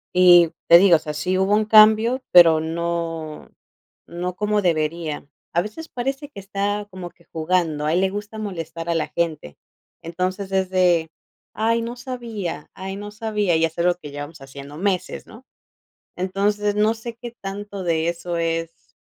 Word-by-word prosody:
Y 175 -2 +7 0.2
te 170 - +10
digo, 180 -2 +6
o - - -8
sea, 150 -1 -6
sí 180 +5 -1
hubo 195 +2 +3
un 215 0 +2
cambio, 220 +4 +6
pero 165 -3 +8
no 165 -1 -4 0.6
no 180 +1 -5
como 210 +1 0
debería. 160 -3 -1 0.3
A 170 - +3
veces 315 +10 -8
parece 270 +4 -4
que 285 - -10
está 200 +1 -2
como 185 -2 -7
que 170 - -27
jugando, 160 -2 0
a 155 - +1
él 180 - +2
le 190 - +2
gusta 205 +2 -6
molestar 170 -5 -5
a 170 - +1
la 165 - 0
gente. 155 - -3 0.5
Entonces, 185 +3 -3
es 190 -1 0
de: 175 -3 +2 0.4
"Ay, 230 +2 +1
no 235 +1 -5
sabía 235 - -6
ay, 190 +1 -6
no 205 +1 -7
sabía", 210 -4 0
y 160 0 +3
es 165 0 -6
algo 175 +1 +3
que 155 -5 -11
llevamos 145 +3 -8
haciendo 140 +2 -10
meses, 190 0 -2
¿no? 235 +4 -15 0.7
Entonces, 205 +3 0
no 210 +1 +3
sé 230 +1 -8
qué 240 0 -8
tanto 200 0 -6
de 165 -2 0
eso 170 0 -3
es: 165 0 -3
185 Hz, 175 wpm, -22 LUFS, 165-210 Hz, 0.7 s, te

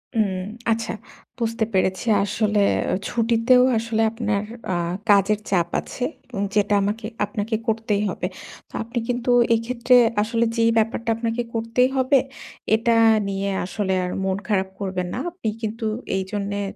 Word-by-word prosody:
উম 195 -4 +1 0.3
আচ্ছা 225 0 -1 0.5
বুঝতে 230 -1 0
পেরেছি। 190 +1 +1 0.2
আসলে 210 0 +1 0.5
ছুটিতেও 235 +2 +3
আসলে 225 0 -1
আপনার 215 -3 -1 0.3
আ - - 0 0.3
কাজের 205 +1 +4
চাপ 175 -3 +1
আছে। 250 - -6 0.3
উ - - -4 0.2
যেটা 205 0 +2
আমাকে 210 +2 -2 0.2
আপনাকে 210 +2 -3
করতেই 220 -2 0
হবে। 180 - -3 0.4
তো - - -27
আপনি 235 +1 -3
কিন্তু 245 0 0 0.2
এক্ষেত্রে 240 +2 +2 0.3
আসলে 230 +2 +1
যেই 230 0 +4
ব্যাপারটা 225 +1 0
আপনাকে 230 +1 -2
করতেই 230 +3 +1
হবে 260 +1 +4 0.6
এটা 230 +1 +2 0.3
নিয়ে 195 0 -2 0.2
আসলে 190 0 -2
আর 180 - -3
মন 190 0 0
খারাপ 190 -3 +1
করবেন 185 -2 -2
না। - - -3
আপনি 350 -10 -6
কিন্তু 220 +1 -3 0.3
এইজন্যে 200 +1 -3
220 Hz, 140 wpm, -23 LUFS, 200-230 Hz, 0.6 s, কাজের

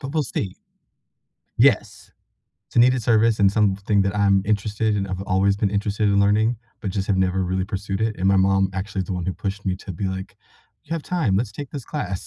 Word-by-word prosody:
but 140 -1 -6
we'll 155 - +1
see. 100 -7 -4 1.0
Yes. - - +2 0.5
It's - - -18
a - - +5
needed 125 +1 +5
service 110 0 +3
and 100 -2 +5
something 100 -1 +1
that 100 0 -1
I'm 100 -1 +3
interested 105 +1 0
and 100 -1 -1
I've 95 0 -4
always 100 +1 +2
been 100 -2 0
interested 105 +1 0
in 100 0 +3
learning, 110 +4 +2 0.2
but 100 - -3
just 95 0 -2
have 100 - +1
never 95 0 +1
really 95 +1 -1
pursued 100 0 -4
it, 110 -1 0
and 95 - 0
my 95 0 +4
mom 95 0 +3
actually 95 +1 -4
is 95 - -3
the - - -4
one 90 -2 -3
who 95 - -1
pushed 100 +2 -5
me 95 -2 -1
to 95 0 -8
be 90 +4 -5
like, 95 0 -5 0.5
"You 165 - -9
have 165 - -2
time, 155 - 0
let's 105 -1 -1
take 140 +4 -7
this 140 -5 -6
class." 100 -12 -4
100 Hz, 230 wpm, -22 LUFS, 95-110 Hz, 1.0 s, a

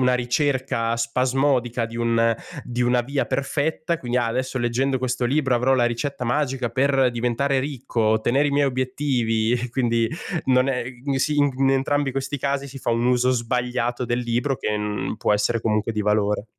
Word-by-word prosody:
una 125 0 +3
ricerca 125 -2 0
spasmodica 125 +1 +1
di 115 +1 -7
un 115 -1 +2 0.3
di 120 0 -2
una 125 0 +3
via 140 +3 -2
perfetta, 155 +4 -1
quindi: 120 0 -2
“Ah, 120 - +1
adesso 130 +3 -2
leggendo 130 +3 0
questo 125 0 -1
libro 130 -1 +2
avrò 130 +2 +2
la 120 -2 +3
ricetta 125 +2 -3
magica 130 -1 0
per 135 0 +2
diventare 125 +3 0
ricco, 130 -3 -3
ottenere 110 +6 +2
i - - 0
miei 145 0 +3
obiettivi.” 125 -4 0
E 125 0 -3
quindi 115 -2 +1 0.4
non 130 0 +3
è 130 -3 -1 0.3
sì, 150 +3 +1
in 145 -1 +4
g 130 - -9
in 135 0 +3
entrambi 135 +1 +1
questi 135 +1 -3
casi 140 +1 -2
si 135 +1 -9
fa 125 - -2
un 115 +1 +1
uso 125 0 +3
sbagliato 125 0 -1
del 120 0 -1
libro, 120 +3 -1
che 105 -1 -2
n 105 +1 -3
può 105 - +1
essere 115 +3 +1
comunque 110 0 0
di 105 -1 -1
valore. 105 0 +1
125 Hz, 185 wpm, -23 LUFS, 115-135 Hz, 0.4 s, in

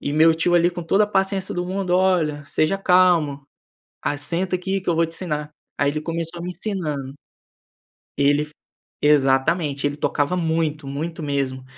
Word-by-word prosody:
E 145 - -3
meu 160 +2 +5
tio 175 +2 +1
ali, 175 0 +4
com 175 0 -6
toda 195 +5 +3
a - - -5
paciência 195 -1 0
do 175 0 -2
mundo: 190 0 -3
"Olha, 170 -6 +1
seja 155 +6 0
calmo, 175 -7 +3 0.6
a 145 - -1
senta 180 +5 -1
aqui 190 +1 -2
que 185 - -3
eu 170 - +2
vou 165 0 +3
te 165 - -8
ensinar. 150 -5 -3 0.3
Aí, 145 0 +2
ele 155 - -3
começou 165 +1 -4
a - - -6
me 180 - -4
ensinan 180 -6 -3 1.2
Ele 145 +1 +2 0.5
Exatamente, 145 +1 +2
ele 145 - -4
tocava 150 +5 0
muito, 160 -3 -1
muito 160 +3 -4
mesmo! 135 -2 -2
165 Hz, 175 wpm, -22 LUFS, 145-180 Hz, 1.2 s, meu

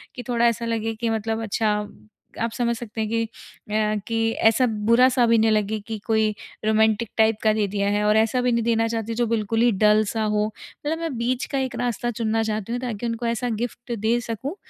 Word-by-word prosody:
कि 245 - -6
थोड़ा 235 -1 +2
ऐसा 235 0 0
लगे 225 -1 -2
कि 230 +1 -2
मतलब 225 0 -1
अच्छा 215 0 0 0.7
आप 230 0 0
समझ 235 0 0
सकते 225 -1 -6
हैं 215 - -2
कि 230 0 +1
अ, 215 -1 -3
कि 225 0 +1 0.2
ऐसा 255 +3 +2 0.2
बुरा 240 +2 +6
सा 250 -1 +3
भी 230 0 +4
नहीं 220 0 +3
लगे 215 0 0
कि 225 - -3
कोई 220 -1 +3 0.4
रोमांटिक 220 0 +2
टाइप 220 -1 +4
का 215 -1 +4
दे 215 -2 0
दिया 200 0 -1
है। 205 0 +1
और 210 +1 +4
ऐसा 225 +3 +2
भी 250 0 +1
नहीं 235 - +1
देना 225 0 +2
चाहती 225 0 -3
जो 240 - +1
बिल्कुल 225 0 0
ही 240 0 +5
डल 210 +1 +5
सा 220 -1 -1
हो। 210 0 +1
मतलब 295 +8 -6
मैं 325 -7 -3
बीच 250 +3 -1
का 275 - 0
एक 260 -1 -2
रास्ता 240 0 -1
चुनना 225 -1 0
चाहती 215 0 -3
हूँ 245 - -2
ताकि 240 -2 -4
उनको 230 +1 -3
ऐसा 235 +1 -1
गिफ्ट 240 0 -5
दे 225 +3 +2
सकूँ, 235 - -5
225 Hz, 225 wpm, -23 LUFS, 215-235 Hz, 0.7 s, बुरा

